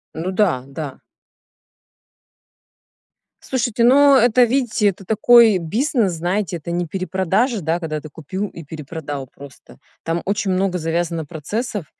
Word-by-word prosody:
Ну 170 +4 -3
да, 185 -10 +1
да. 140 -1 -7 2.4
Слушайте, 240 -3 -1
ну, 280 +3 +6
это, 245 0 +5
видите, 240 -3 +1
это 195 0 -8
такой 220 0 +5
бизнес, 210 - 0
знаете, 175 +2 -2
это 170 +1 -7
не 175 0 -2
перепродажа, 190 - -1
да, 165 +2 -1
когда 155 -2 -4
ты 155 - -11
купил 175 +7 -5
и 170 - -10
перепродал 145 -2 -7
просто. 140 +1 -15 0.2
Там 165 +1 -2
очень 200 0 -1
много 185 0 0
завязано 165 -1 -2
процессов. 200 - -4
185 Hz, 130 wpm, -20 LUFS, 160-220 Hz, 2.4 s, ну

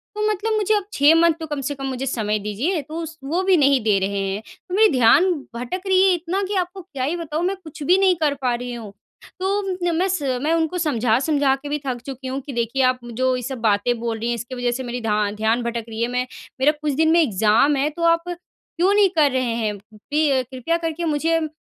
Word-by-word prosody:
तो 425 0 0
मतलब 430 +2 -1
मुझे 430 0 +1
अब 410 - 0
6 290 +3 +5
मंथ 335 -1 +5
तो 320 - -4
कम 290 -2 -3
से 285 +2 -3
कम 270 0 -6
मुझे 265 0 -3
समय 215 -4 -1
दीजिए 245 - -2
तो 320 +4 -6
स - - -7
उस 325 - -15
वो 360 +3 +1
भी 375 -1 +4
नहीं 275 -3 +4
दे 210 -2 +3
रहे 200 +1 -2
हैं। 195 +2 -3 0.3
तो 360 - -2
मेरी 435 +1 +6
ध्यान 265 +9 +5 0.3
भटक 250 +10 -4
रही 375 -1 +4
है 375 - +5
इतना 355 +3 -2
कि 405 - -3
आपको 365 +1 -2
क्या 285 -8 -6
ही 300 +6 0
बताऊँ 325 0 -3
मैं 390 +2 0
कुछ 315 -2 -11
भी 360 +6 +4
नहीं 385 -2 +4
कर 295 -2 +2
पा 250 -2 +1
रही 245 0 -5
हूँ। 220 -4 -8 0.5
तो 375 -2 -1
म - - -1
मैं 370 +3 +2
स 370 -3 -1 0.2
मैं 315 - +2
उनको 330 +2 0
समझा-समझा 275 -1 +2
के 285 +1 -9
भी 295 0 -1
थक 245 -2 -3
चुकी 265 -1 -7
हूँ 265 +1 -3
कि 280 - -6
देखिए 235 +3 -1
आप 255 0 +2
जो 255 +2 +1
ये 250 - -3
सब 265 +2 -5
बातें 225 +2 +1
बोल 230 -1 -2
रही 230 - -3
हैं 240 - 0
इसकी 235 +3 -7
वजह 245 -1 -1
से 255 +2 -4
मेरी 245 0 -4
ध्या 210 -2 0
ध्यान 225 +3 +1
भटक 235 -1 -3
रही 225 0 -5
है। 235 - +2
मैं 250 0 0 0.3
मेरा 275 +3 +5
कुछ 295 -2 0
दिन 320 +3 +3
में 340 - +5
एग्ज़ाम 225 - +3
है 280 +2 +1
तो 335 +3 -6
आप 335 0 +3
क्यों 355 +1 -2
नहीं 410 -2 +5
कर 295 -4 +4
रहे 260 0 0
हैं? 215 -3 -2 0.2
पे 280 +3 0
कृपया 260 +6 -2
करके 335 0 -3
मुझे 320 +2 +1
उम, 315 - -2
280 Hz, 255 wpm, -22 LUFS, 240-335 Hz, 0.5 s, मेरी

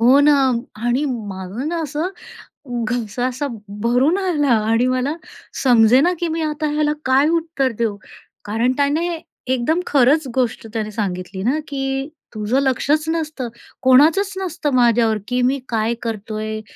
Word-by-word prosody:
हो 250 +4 +6
ना. 295 +1 +6 0.4
आणि 240 +5 0
माझं 205 +1 -5
ना 340 0 -2
असं, 305 +3 -2 0.8
घसा 245 -1 -2
असा 260 +3 -3 0.4
भरून 255 +9 +3
आला 350 -7 0 0.2
आणि 235 +2 +3
मला 255 +3 0 0.5
समजे 245 0 +6
ना, 350 +4 +3
की 345 - 0
मी 325 0 -2
आता 305 0 -1
ह्याला 300 0 +1
काय 265 +3 +4
उत्तर 315 -5 -1
देऊ? 225 -3 0 0.5
कारण 225 +4 +1
त्याने 290 +4 +1 0.5
एकदम 260 +7 +1
खरंच 280 +2 +3
गोष्ट 245 -3 -1
त्याने 215 -2 -3
सांगितली 190 -2 -4
ना, 265 +8 +1
की 270 0 -2 0.2
तुझं 215 +4 0
लक्षच 280 +3 +1
नसतं. 310 -6 -2 0.3
कोणाचंच 305 +10 +5
नसतं 340 -5 -2
माझ्यावर, 235 -2 +3
की 250 0 0
मी 275 +2 0
काय 225 0 0
करतोय? 215 -1 -4
260 Hz, 145 wpm, -20 LUFS, 230-300 Hz, 0.8 s, हो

